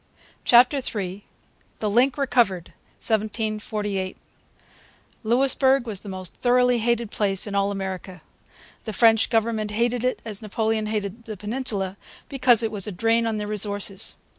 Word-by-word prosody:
CHAPTER 250 +4 +5
III 200 -6 -4 0.5
THE 215 - -2
LINK 245 +6 +2
RECOVERED 235 - +1 0.3
1748 215 -3 -2 1.1
Louisbourg 265 +2 +3
was 210 -4 0
the 205 - -9
most 185 -2 -6
thoroughly 250 0 +3
hated 235 -1 0
place 195 -3 0
in 205 - -6
all 200 0 +1
America. 190 -3 -6 0.6
The 220 - -4
French 225 +1 +4
government 225 -2 0
hated 235 +3 0
it 255 - 0
as 215 -2 -5
Napoleon 220 0 -1
hated 210 +1 -4
the 215 -2 -7
Peninsula, 205 -3 -4 0.3
because 250 -4 +4
it 220 - -1
was 205 -2 0
a - - -3
drain 225 +5 +1
on 220 -1 -1
their 210 - -3
resources. 205 -1 0
215 Hz, 140 wpm, -24 LUFS, 200-235 Hz, 1.1 s, CHAPTER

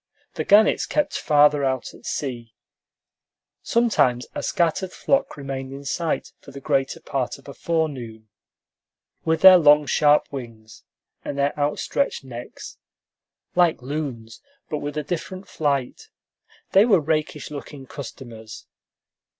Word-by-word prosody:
The - - -3
gannets 210 +2 +4
kept 300 - 0
farther 145 -1 +4
out 130 -2 -2
at - - -13
sea. 120 -5 -4 1.1
Sometimes 205 - +2
a - - -4
scattered 175 +2 0
flock 275 - 0
remained 135 -1 -5
in 140 +1 -9
sight 165 +3 -2
for - - -15
the 140 0 -9
greater 135 -1 -1
part 135 -1 -3
of 140 - -19
a 140 - -8
forenoon. 130 -11 -3 1.0
With 160 0 +1
their 185 -1 +10
long, 150 -1 +6
sharp 150 +2 +3
wings 115 -5 -9 0.4
and 140 - -5
their 140 +1 +1
outstretched 150 - -1
necks, 120 -2 -10 0.7
like 175 -7 +2
loons, 130 -6 -5 0.3
but 150 - -1
with 145 +1 -5
a 150 - -1
different 185 +5 -5
flight, 140 -5 -2 0.6
they 195 - +6
were 215 -6 +4
rakish 155 -1 -2
looking 140 -1 -8
customers. 120 -5 -10
145 Hz, 130 wpm, -23 LUFS, 130-160 Hz, 1.1 s, their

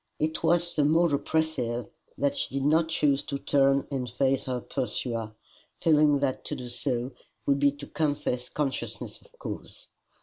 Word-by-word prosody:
It 155 +1 -1
was 170 +1 +2
the 150 - +3
more 160 +2 +4
oppressive 140 -6 0 0.3
that 140 0 +1
she - - -2
did 135 - 0
not 160 +2 +3
choose 140 -3 +2
to 140 - -4
turn 135 0 +3
and 130 -3 -2
face 130 +3 +1
her 125 -1 -1
pursuer, 115 -3 -3 0.4
feeling 150 -2 +4
that 135 -2 0
to - - -3
do 125 -1 -6
so 125 0 -1 0.3
would 140 0 +3
be 140 0 +5
to 145 0 -9
confess 145 -5 -1
consciousness 145 -3 -3
of - - -23
cause. - - -7
140 Hz, 165 wpm, -28 LUFS, 130-155 Hz, 0.4 s, be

